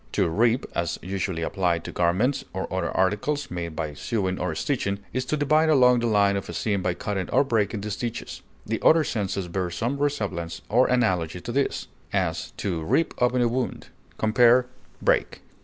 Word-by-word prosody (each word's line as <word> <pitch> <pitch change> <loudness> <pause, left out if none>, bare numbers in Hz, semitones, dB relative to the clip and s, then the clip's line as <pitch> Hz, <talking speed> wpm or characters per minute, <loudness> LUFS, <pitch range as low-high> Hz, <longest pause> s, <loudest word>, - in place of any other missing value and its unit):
To - - +2
rip, 115 +9 +2
as 85 0 -1
usually 95 -2 -2
applied 85 -2 0
to - - -6
garments 95 +11 +1
or 95 0 -2
other 95 - -1
articles 105 +11 0
made 85 -3 -4
by 75 -2 -3
sewing 95 - -2
or 90 -3 -2
stitching, 100 - -1 0.2
is 130 - -1
to 155 - -1
divide 155 +2 +3
along 125 -4 +5
the 120 - 0
line 100 -2 +3
of 100 - -4
a - - -5
seam 100 -3 -1
by 90 -1 -1
cutting 95 -1 -3
or - - +4
breaking 110 -5 0
the 105 +1 -4
stitches; 115 +3 -5 0.2
the 110 +1 -2
other 160 0 +6
senses 100 -7 -2
bear 90 +1 -2
some 120 +10 -2
resemblance 100 -13 -2
or 120 +5 +4
analogy 90 -9 +1
to 120 - -5
this; 140 +2 -1 0.2
as, - - -1
to 90 -5 -2
rip 160 - +1
open 125 0 +3
a - - +3
wound. 125 +2 -3 0.3
Compare 120 +3 +5 0.4
BREAK. - - +1
105 Hz, 185 wpm, -25 LUFS, 90-125 Hz, 0.4 s, other